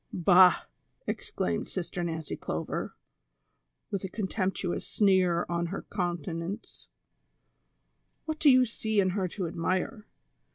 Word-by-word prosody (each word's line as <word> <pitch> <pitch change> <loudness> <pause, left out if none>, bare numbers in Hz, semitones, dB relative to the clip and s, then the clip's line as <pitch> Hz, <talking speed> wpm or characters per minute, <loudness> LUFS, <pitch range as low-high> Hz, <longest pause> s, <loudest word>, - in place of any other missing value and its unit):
" - - -45 0.2
Bah! 180 0 +7 0.2
" - - -44
exclaimed 85 -1 -2
Sister 175 -1 -3
N'ancy 160 -2 -3
Clover, - - -4 1.0
with 200 -1 -2
a 190 - -3
con 210 +1 -3
temptuous 190 -2 -1
sneer 185 -4 +3
on 170 0 -1
her 195 +4 -5
countenance, 175 +1 -4 0.7
" - - -47
wliat 315 -1 -3
do 305 - +6
you 255 -1 +7
see 220 -2 -1
in 185 -2 +3
her 190 -1 0
to 185 +1 -4
admire 185 +5 -2
185 Hz, 135 wpm, -29 LUFS, 170-205 Hz, 1.0 s, Bah